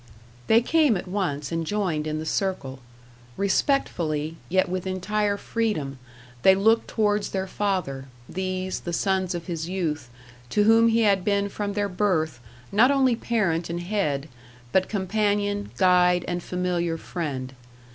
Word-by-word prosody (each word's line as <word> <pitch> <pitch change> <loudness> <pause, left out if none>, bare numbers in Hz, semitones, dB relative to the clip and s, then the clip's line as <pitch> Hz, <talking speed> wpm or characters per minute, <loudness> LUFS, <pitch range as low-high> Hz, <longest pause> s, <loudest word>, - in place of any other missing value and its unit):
They 225 +1 +6
came 295 - +3
at 175 - -7
once 175 -7 -2
and 165 0 -1
joined 165 -4 -1
in 155 0 -2
the 155 - -4
circle; 155 -7 -2 0.6
respectfully, 165 - 0
yet 185 +2 +2
with 185 +1 -3
entire 200 +2 0
freedom, 180 - -2 0.4
they 190 +7 +6
looked 225 +4 +3
towards 210 -2 +1
their 190 -1 -2
father 185 -10 -2 0.2
these, 185 0 -3
the 175 - -5
sons 190 0 0
of 170 - -5
his 170 -2 -4
youth, 160 -8 -2 0.4
to 210 - +2
whom 225 +2 +6
he 230 0 +3
had 200 -4 +3
been 200 0 +1
from 205 0 -3
their 205 0 0
birth, 180 - 0 0.3
not 225 +6 +5
only 265 -3 +3
parent 190 -9 0
and 170 +1 -3
head, 165 -8 -1 0.4
but 190 0 +2
companion, 205 0 0
guide, 180 -1 +4
and 175 0 -2
familiar 175 -2 -1
friend. 140 -7 -4
185 Hz, 145 wpm, -25 LUFS, 165-205 Hz, 0.6 s, They